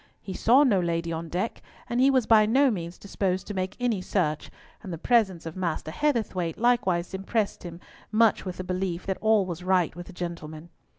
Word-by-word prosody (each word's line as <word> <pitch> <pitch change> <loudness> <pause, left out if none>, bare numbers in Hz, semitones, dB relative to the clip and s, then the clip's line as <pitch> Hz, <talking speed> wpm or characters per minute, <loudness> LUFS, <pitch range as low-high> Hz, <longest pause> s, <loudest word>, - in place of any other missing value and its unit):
He 190 - -7
saw 250 +9 +5
no 220 -9 +3
lady 170 -1 -1
on 165 0 -5
deck, 185 +7 -3 0.3
and 240 +1 0
he 270 - +6
was 260 -4 +3
by 215 -2 +5
no 265 +4 +4
means 170 -4 -5
disposed 190 -2 -2
to 210 - -6
make 185 -1 -3
any 235 -6 0
search, 160 -6 -1 0.3
and 190 - -8
the 165 - -4
presence 195 -3 +2
of 165 - -6
Master 170 -4 -3
Heatherthwayte 195 - -1
likewise 195 -8 +1
impressed 200 +2 -1
him 170 -1 -8 0.3
much 225 0 +3
with 185 -2 -6
the 185 - -4
belief 185 -1 -3
that 190 -1 -2
all 220 -2 +3
was 175 -1 -6
right 180 -3 +2
with 175 0 -8
the 190 - -11
gentlemen. 170 -2 -7
185 Hz, 200 wpm, -26 LUFS, 170-220 Hz, 0.3 s, he